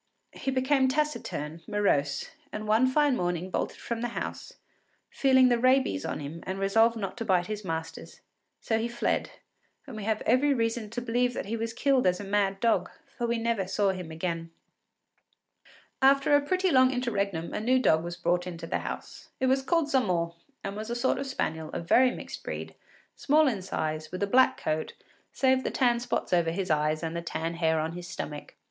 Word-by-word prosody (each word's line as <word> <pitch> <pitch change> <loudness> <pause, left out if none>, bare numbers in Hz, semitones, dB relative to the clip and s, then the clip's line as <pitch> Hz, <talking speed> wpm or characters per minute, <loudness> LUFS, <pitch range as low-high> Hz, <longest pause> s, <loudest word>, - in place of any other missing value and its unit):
He - - -4
became 265 +1 +2
taciturn, 255 - -2
morose, 145 -9 0 0.2
and 215 0 -5
one 220 +4 +4
fine 290 0 +3
morning 180 -2 -2
bolted - - -2
from 235 -1 -4
the 240 - 0
house, - - -5 0.6
feeling 260 -2 +4
the 240 -1 +2
rabies 255 - +2
on - - -3
him 150 +4 -7
and 190 +1 -3
resolved 225 +4 +3
not 195 -3 -4
to 230 - -3
bite 185 -5 +2
his 215 +1 -5
masters; 160 -2 -6 0.4
so 225 -1 0
he 230 - -1
fled, 235 0 -1 0.6
and 265 -5 -9
we 215 - -6
have 220 -1 0
every 270 +4 +3
reason 230 -2 -1
to 245 +3 -5
believe 245 +1 +1
that - - -3
he 215 +3 -3
was 230 0 -3
killed 260 0 +2
as 180 0 +2
a - - -5
mad 195 -1 0
dog, 230 +1 +2 0.3
for 240 - -2
we 235 0 0
never 230 -4 -1
saw 195 +1 +1
him 180 -3 -6
again. 165 0 -3 1.5
After 275 +2 +5
a 290 - +4
pretty 370 +5 +1
long 255 -2 +6
interregnum 200 -9 -2
a - - -1
new 250 +4 +3
dog 160 -11 +3
was 175 0 -5
brought 175 0 0
into 170 -2 -6
the - - -1
house. - - -7
It 260 - +1
was 265 +1 +3
called 310 +1 +1
Zamore, 180 -10 +1 0.3
and 195 0 -4
was 215 +2 -6
a 235 - -2
sort 240 +2 +1
of 275 - -3
spaniel, 160 -11 -3
of 170 - -5
very 255 +6 +6
mixed - - -7
breed, - - -5 0.4
small 305 +2 +3
in 220 -7 -1
size, 155 -4 -3
with 185 +2 -3
a - - +4
black 255 +6 +4
coat, 155 0 -2 0.4
save 260 -1 +2
the - - -1
tan 240 -3 +2
spots 240 -5 -2
over 170 -2 +3
his 180 +1 -2
eyes 155 +1 +1
and 165 0 -3
the 170 - -2
tan 165 0 -3
hair 160 -1 +1
on 160 +1 -2
his 175 +1 -7
stomach. 150 -5 -7
215 Hz, 200 wpm, -28 LUFS, 170-255 Hz, 1.5 s, long